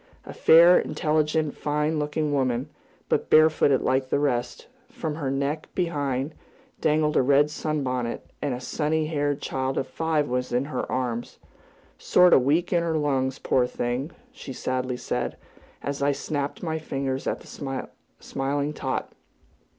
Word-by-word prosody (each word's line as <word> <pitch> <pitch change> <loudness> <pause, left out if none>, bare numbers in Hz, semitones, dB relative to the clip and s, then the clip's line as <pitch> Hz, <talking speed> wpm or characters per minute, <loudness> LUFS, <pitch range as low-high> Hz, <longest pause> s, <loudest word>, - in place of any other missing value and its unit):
A - - -8
fair, 170 +2 +7
intelligent, 155 -1 0
rather - - -12
fine 150 +1 0
looking 150 0 -1
woman, 130 0 0 0.4
but - - 0
barefooted 155 -4 +5
like 130 0 +1
the - - +2
rest; 130 -4 -1 0.2
from 155 - -4
her 145 -3 -3
neck 140 +3 -2
behind, 145 -5 -1 0.5
dangled 150 0 +2
a - - +5
red 140 +3 +4
sunbonnet, 130 -6 -2 0.2
and 140 -4 -1
a - - -6
sunny 155 +4 -1
haired 145 -2 -1
child 130 0 -2
of - - 0
five 155 +1 0
was 125 +1 -2
in 125 +2 +1
her 150 - -4
arms 120 -2 -2 0.6
"sort 180 0 +5
o' - - +8
weak 155 +8 +1
in 170 - +3
her 165 -1 0
lungs, 135 -3 0
poor 125 -1 +1
thing!" 125 +4 -2 0.2
she 255 - -9
sadly 130 0 -2
said, - - -3 0.5
as 140 0 -3
I 140 0 +3
snapped 145 +2 -3
my 160 -2 -2
fingers 135 -3 -3
at - - -2
the 135 -2 -5 0.4
smiling 140 +2 -2
tot. 130 -3 -3
145 Hz, 155 wpm, -25 LUFS, 130-155 Hz, 0.6 s, o